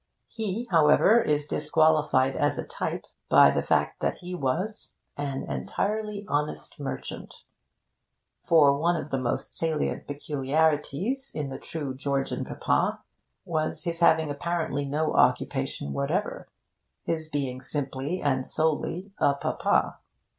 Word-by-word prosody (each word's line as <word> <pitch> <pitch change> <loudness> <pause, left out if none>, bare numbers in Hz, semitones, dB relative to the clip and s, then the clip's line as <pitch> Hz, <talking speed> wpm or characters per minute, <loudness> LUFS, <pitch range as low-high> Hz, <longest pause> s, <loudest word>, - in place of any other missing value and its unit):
He, 225 +1 -4
however, 165 +8 +6
is 150 -6 +1
disqualified 150 -3 +2
as 145 - +1
a - - -3
type - - -4 0.2
by 70 - +7
the - - 0
fact - - +1
that - - 0
he 180 0 -8
was 180 +8 -2 0.2
'an 140 -2 -3
entirely 205 - -3
honest 150 0 -2
merchant.' 140 - -6 1.0
For 145 -4 +5
one 170 +3 +2
of 155 -2 -5
the 135 - 0
most 125 -2 -2
salient 160 -2 -1
peculiarities 150 - 0
in 150 -3 -3
the 135 - -6
true 145 -5 -5
Georgian 135 0 -2
Papa - - 0 0.4
was 155 -1 -1
his 170 -1 -2
having 160 -3 +4
apparently 155 -1 -2
no 155 +3 0
occupation 70 - +1
whatever 165 +9 -2 0.5
his 160 -1 -2
being 135 -4 -3
simply 140 +4 -3
and 130 -3 +1
solely 160 +6 -1
a 140 - +3
Papa. - - 0
150 Hz, 125 wpm, -27 LUFS, 140-170 Hz, 1.0 s, by